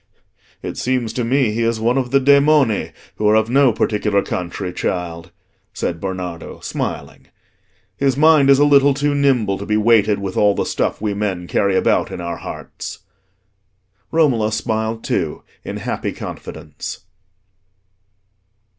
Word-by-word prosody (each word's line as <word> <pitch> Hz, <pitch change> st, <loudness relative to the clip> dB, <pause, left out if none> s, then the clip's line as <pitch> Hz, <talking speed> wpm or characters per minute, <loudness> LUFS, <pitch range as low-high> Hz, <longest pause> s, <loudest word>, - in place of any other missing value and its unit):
"It -, -, -5 dB
seems 125 Hz, -3 st, -1 dB
to 125 Hz, -, -2 dB
me 125 Hz, -1 st, +2 dB
he 115 Hz, +2 st, -2 dB
is 115 Hz, -1 st, 0 dB
one 120 Hz, +3 st, +1 dB
of 130 Hz, -2 st, 0 dB
the 140 Hz, +2 st, +4 dB
demoni, 140 Hz, -3 st, +3 dB, 0.3 s
who 105 Hz, -, +1 dB
are 105 Hz, -, +4 dB
of 110 Hz, +1 st, +2 dB
no 135 Hz, -1 st, +5 dB
particular 105 Hz, -2 st, 0 dB
country, 90 Hz, 0 st, -4 dB
child," 85 Hz, -2 st, -3 dB, 0.5 s
said 85 Hz, -1 st, -3 dB
Bernardo, 90 Hz, -3 st, -5 dB
smiling. -, -, -5 dB, 0.7 s
"His 135 Hz, -1 st, +1 dB
mind 155 Hz, -2 st, +5 dB
is 135 Hz, -, +7 dB
a 145 Hz, -, +4 dB
little 140 Hz, -1 st, +5 dB
too 145 Hz, +1 st, 0 dB
nimble 130 Hz, -9 st, +1 dB
to 100 Hz, -, -6 dB
be 105 Hz, -, +1 dB
weighted 110 Hz, -2 st, +3 dB
with 100 Hz, -2 st, -5 dB
all 105 Hz, -1 st, +3 dB
the -, -, -1 dB
stuff -, -, -2 dB
we 105 Hz, -1 st, -1 dB
men 100 Hz, -4 st, -2 dB
carry 100 Hz, +2 st, +1 dB
about -, -, +2 dB
in -, -, -6 dB
our 85 Hz, 0 st, -4 dB
hearts." -, -, -8 dB, 1.1 s
Romola 125 Hz, -10 st, +2 dB
smiled 110 Hz, 0 st, -2 dB
too, -, -, -2 dB, 0.2 s
in -, -, -5 dB
happy -, -, -3 dB
confidence. 80 Hz, -2 st, -8 dB
110 Hz, 150 wpm, -19 LUFS, 100-135 Hz, 1.1 s, is